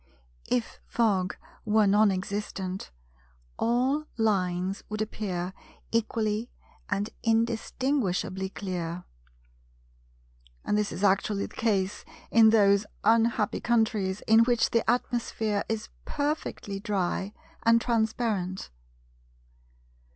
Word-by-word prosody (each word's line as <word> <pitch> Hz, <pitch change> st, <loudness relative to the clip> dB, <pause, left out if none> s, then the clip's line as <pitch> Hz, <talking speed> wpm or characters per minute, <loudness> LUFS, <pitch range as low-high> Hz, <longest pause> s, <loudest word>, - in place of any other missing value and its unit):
If 245 Hz, -2 st, -1 dB
Fog 195 Hz, -6 st, +1 dB, 0.3 s
were 215 Hz, 0 st, +3 dB
non 205 Hz, +2 st, +5 dB
existent, 190 Hz, 0 st, -4 dB, 0.7 s
all 260 Hz, +6 st, +1 dB
lines 190 Hz, -3 st, 0 dB
would 215 Hz, 0 st, -4 dB
appear 190 Hz, -4 st, -3 dB, 0.4 s
equally 220 Hz, 0 st, 0 dB, 0.4 s
and 205 Hz, +1 st, -1 dB
indistinguishably 225 Hz, -4 st, 0 dB
clear; 180 Hz, -3 st, -4 dB, 1.6 s
and -, -, +1 dB
this 210 Hz, -1 st, 0 dB
is 195 Hz, -, -5 dB
actually 200 Hz, +1 st, +2 dB
the -, -, -12 dB
case 205 Hz, -3 st, 0 dB, 0.3 s
in 225 Hz, -1 st, +7 dB
those 205 Hz, -2 st, +4 dB, 0.2 s
unhappy 225 Hz, -2 st, +3 dB
countries 215 Hz, -5 st, +1 dB
in 225 Hz, +1 st, +6 dB
which 235 Hz, 0 st, +3 dB
the 230 Hz, -1 st, +1 dB
atmosphere 230 Hz, -4 st, 0 dB
is 220 Hz, -1 st, -3 dB
perfectly 285 Hz, -9 st, -3 dB
dry 195 Hz, -1 st, -1 dB, 0.3 s
and 230 Hz, 0 st, +5 dB
transparent. 220 Hz, -, -1 dB
210 Hz, 95 wpm, -28 LUFS, 195-230 Hz, 1.6 s, in